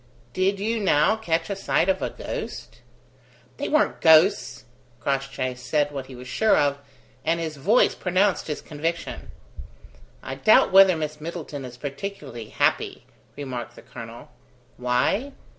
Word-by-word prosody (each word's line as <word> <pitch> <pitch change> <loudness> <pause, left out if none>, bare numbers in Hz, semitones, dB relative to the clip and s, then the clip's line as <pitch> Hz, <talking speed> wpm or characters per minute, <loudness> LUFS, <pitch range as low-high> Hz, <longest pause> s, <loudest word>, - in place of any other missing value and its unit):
Did 195 +1 +1
you, 225 +3 -1
now, 185 -1 +3
catch 165 -7 -1
a - - -1
sight 190 - +1
of 190 -1 +1
a - - -1
ghost?" - - -7 0.8
"They - - -3
weren't 305 - +1
ghosts!" 160 - +4 0.3
Crossjay 135 0 -2
said 135 +4 -1
what 135 -2 -6
he 130 - -10
was 125 +1 -10
sure 220 +11 +3
of, 140 -1 +1 0.4
and 165 +1 +1
his 160 -2 -4
voice 205 - +3
pronounced 185 +2 +1
his 150 - -4
conviction. 165 +3 -4 0.9
"I - - -5
doubt 215 - +4
whether 190 -2 +7
Miss 155 -1 -4
Middleton 155 -4 -6
is 125 -1 -10
particularly 140 - -6
happy," - - 0 0.3
remarked 130 -4 -6
the - - -14
colonel. 120 -1 -10 0.5
"Why? 125 - 0
155 Hz, 140 wpm, -24 LUFS, 135-190 Hz, 0.9 s, whether